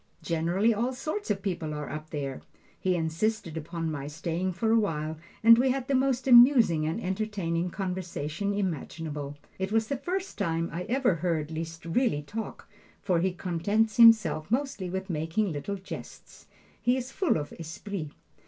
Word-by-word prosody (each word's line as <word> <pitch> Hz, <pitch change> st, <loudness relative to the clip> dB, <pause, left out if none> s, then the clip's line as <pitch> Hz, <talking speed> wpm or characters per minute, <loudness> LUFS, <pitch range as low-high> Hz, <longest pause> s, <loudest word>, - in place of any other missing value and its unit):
Generally 175 Hz, +7 st, +2 dB
all 240 Hz, +5 st, -1 dB
sorts 310 Hz, +10 st, -4 dB
of 195 Hz, -2 st, -1 dB
people 170 Hz, -6 st, -2 dB
are 150 Hz, -1 st, -4 dB
up 155 Hz, 0 st, -6 dB
there. 140 Hz, -3 st, -4 dB, 0.4 s
He 185 Hz, -1 st, +1 dB
insisted 165 Hz, +2 st, -1 dB
upon 165 Hz, +1 st, -3 dB
my 140 Hz, -2 st, -4 dB
staying 170 Hz, +4 st, -2 dB
for 220 Hz, +5 st, 0 dB
a 230 Hz, -, +5 dB
while, 155 Hz, -6 st, -2 dB, 0.2 s
and 230 Hz, +1 st, +9 dB
we 260 Hz, +1 st, +3 dB
had 260 Hz, 0 st, -1 dB
the 280 Hz, -, 0 dB
most 265 Hz, -1 st, +1 dB
amusing 240 Hz, -, +7 dB
and 165 Hz, +7 st, -1 dB
entertaining 185 Hz, -4 st, -2 dB
conversation 180 Hz, -1 st, -3 dB
imaginable. 155 Hz, -6 st, -3 dB, 0.2 s
It 190 Hz, +1 st, -2 dB
was 220 Hz, 0 st, +1 dB
the 280 Hz, -, -1 dB
first 365 Hz, +6 st, -4 dB
time 165 Hz, -3 st, 0 dB
I 180 Hz, +2 st, -3 dB
ever 255 Hz, -3 st, +2 dB
heard 160 Hz, -2 st, -1 dB
Liszt 165 Hz, +1 st, -6 dB
really 170 Hz, -, +1 dB
talk, 220 Hz, +9 st, -6 dB, 0.3 s
for 180 Hz, -4 st, +1 dB
he 185 Hz, +2 st, +1 dB
contents 195 Hz, +5 st, 0 dB
himself 215 Hz, -10 st, +6 dB
mostly 240 Hz, -7 st, -1 dB
with 190 Hz, +1 st, -3 dB
making 170 Hz, +4 st, -1 dB
little 155 Hz, +7 st, -3 dB
jests. 190 Hz, -1 st, -10 dB, 0.3 s
He 245 Hz, +2 st, +3 dB
is 260 Hz, +1 st, -5 dB
full 375 Hz, -, +1 dB
of 145 Hz, -1 st, -5 dB
esprit. 165 Hz, +2 st, -5 dB
185 Hz, 165 wpm, -28 LUFS, 160-225 Hz, 0.4 s, and